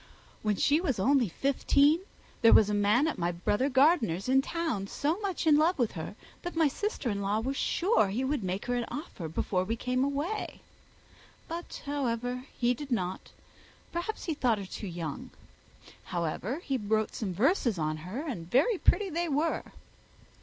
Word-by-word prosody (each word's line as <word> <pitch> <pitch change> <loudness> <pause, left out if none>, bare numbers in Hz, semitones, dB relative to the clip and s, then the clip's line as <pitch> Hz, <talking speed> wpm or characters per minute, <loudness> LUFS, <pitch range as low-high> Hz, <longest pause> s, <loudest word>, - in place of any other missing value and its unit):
When 210 -1 +1
she 295 - +3
was 280 - 0
only 245 +2 +3
fifteen 280 - +3 0.4
there 230 - +7
was 210 -1 +6
a - - 0
gentleman 205 +8 +3
at 315 - -3
my 175 0 +1
brother 205 +10 0
Gardiner's 260 - +3
in 265 +1 +4
town 315 - -2
so 305 - -1
much 395 -6 -2
in 305 -2 +6
love 330 +4 +3
with 240 -5 +1
her, 165 +3 -6 0.3
that 350 - -5
my 325 -2 +4
sister 290 - -2
in 200 0 -2
law 200 +2 0
was 265 +5 -2
sure 355 - +2
he 215 +7 -2
would 265 -3 -1
make 185 +2 -3
her 245 - -1
an 240 -1 0
offer 285 - -6
before 180 +4 -1
we 220 +5 -2
came 255 +2 0
away. 290 +10 -2 0.9
But, 340 +1 -6
however, 250 -3 -2
he 245 0 +2
did 275 +3 -8
not. 185 -5 -2 0.6
Perhaps 345 +6 -3
he 330 - -1
thought 245 -6 +1
her 200 - -5
too 200 +2 -7
young. 165 -5 -5 0.8
However, 180 - -3
he 270 - -1
wrote 215 -1 0
some 190 -5 -3
verses 240 - +2
on 155 -1 -1
her, 200 - -6
and 175 - -5
very 325 - +3
pretty 405 -3 +2
they 340 +1 -1
were." 300 +3 +1
250 Hz, 180 wpm, -29 LUFS, 200-300 Hz, 0.9 s, there